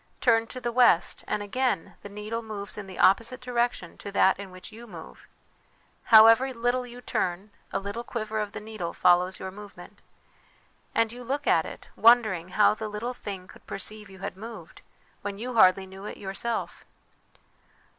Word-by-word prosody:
Turn 230 -2 +3
to 255 - -7
the 240 -1 -2
west, 235 -8 +3
and 205 - -1
again 250 -3 -1
the 205 - -9
needle 210 +3 -5
moves 210 -3 -7
in 210 -2 -7
the 185 - -10
opposite 230 +6 +3
direction 240 -7 -2
to 200 - -7
that 190 -1 +3
in 200 -1 -7
which 185 +3 -11
you 230 +2 -11
move. 170 -6 -12 0.8
However 225 +4 +7
little 245 +2 0
you 245 +1 -11
turn, 190 -1 -2 0.2
a - - 0
little 200 +4 -5
quiver 220 -2 -3
of 210 -1 -3
the - - -5
needle 210 -5 -6
follows 180 +1 +3
your 190 - -5
movement. 205 0 -12 0.9
And 230 -1 +2
you 245 +1 -9
look 270 +4 -3
at - - +3
it, - - -11
wondering 215 -7 +4
how 210 +3 +4
the 215 0 -5
little 220 +4 -4
thing 195 -6 -7
could - - -17
perceive 210 +2 -6
you 190 - -13
had 190 - -6
moved, 225 +4 -10 0.4
when 200 -1 -5
you 245 +4 -5
hardly 190 -3 +5
knew 190 +1 -11
it - - -7
yourself. 205 +4 -4
215 Hz, 175 wpm, -27 LUFS, 195-235 Hz, 0.9 s, However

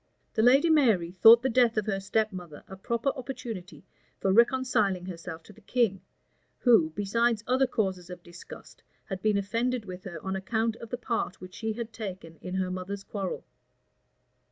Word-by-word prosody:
The - - +1
lady 270 +8 +5
Mary 220 - +3
thought 225 +6 +7
the - - +2
death 240 -2 +3
of 215 - +1
her 195 -2 -1
step 215 +2 0
mother 175 -5 -9
a 190 - -9
proper 235 +6 -1
opportunity 240 -9 -7 0.3
for 190 - +1
reconciling 235 -5 +2
herself 165 -2 -7
to - - -15
the - - -19
king, 205 -3 0 0.6
who, 225 -11 +4
besides 225 +2 +1
other 260 +1 +2
causes 190 -7 -2
of 180 -1 -9
disgust, 175 0 -13 0.2
had 190 -2 -6
been 215 0 +2
offended 230 +4 -1
with 185 -1 -9
her 175 -3 -6
on 190 0 -2
account 220 +3 -1
of 230 - -10
the 245 - -3
part 230 -6 -3
which 185 0 -11
she 220 0 -3
had 230 0 -6
taken 185 -7 -7
in 180 +3 -6
her 185 -1 -1
mother's 190 +2 -5
quarrel. 195 -3 -5
210 Hz, 180 wpm, -28 LUFS, 185-235 Hz, 0.6 s, thought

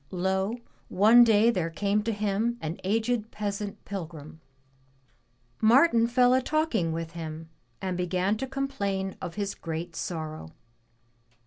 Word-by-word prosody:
Lo! 190 +4 -1 0.3
one 220 +6 +7
day 225 0 +5
there 180 -7 -1
came 200 +5 0
to 225 +2 -2
him 215 +3 -1
an 160 +2 -5
aged 225 +3 0
peasant 205 -1 -5
pilgrim. 160 -5 -7 1.2
Martin 230 +1 +5
fell 250 +1 +4
a 260 - +3
talking 260 - 0
with 165 0 -4
him 160 -1 -7 0.3
and 185 -1 -1
began 180 +3 0
to 265 +5 -4
complain 200 -9 -2
of 175 -2 -6
his 200 -1 -2
great 165 +1 -6
sorrow. 155 - -5
200 Hz, 130 wpm, -27 LUFS, 170-230 Hz, 1.2 s, one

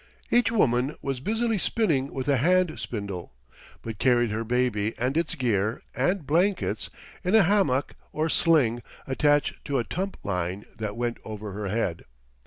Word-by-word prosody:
Each 240 -1 +4
woman 135 - +2
was 135 -2 -2
busily 225 - 0
spinning 155 - +1
with 130 0 -4
a 140 -2 +3
hand 180 +4 +2
spindle, 100 - -5 0.5
but 110 -3 -6
carried 120 -3 +3
her 110 +1 -1
baby 115 -3 0
and 125 +4 -1
its 165 0 0
gear 110 -5 0
and 175 +5 0
blankets 180 +6 +1 0.3
in 185 +3 +2
a 220 - +7
hammock 175 -8 +2 0.2
or 155 +1 0
sling 145 -9 +3 0.2
attached 145 +2 +1
to 140 -2 0
a 120 - +1
tump 190 +9 -4
line 90 +1 -2
that 105 0 -4
went 120 -1 -2
over 105 -1 -6
her 100 +1 -4
head. 95 -4 -2
130 Hz, 160 wpm, -26 LUFS, 110-170 Hz, 0.5 s, a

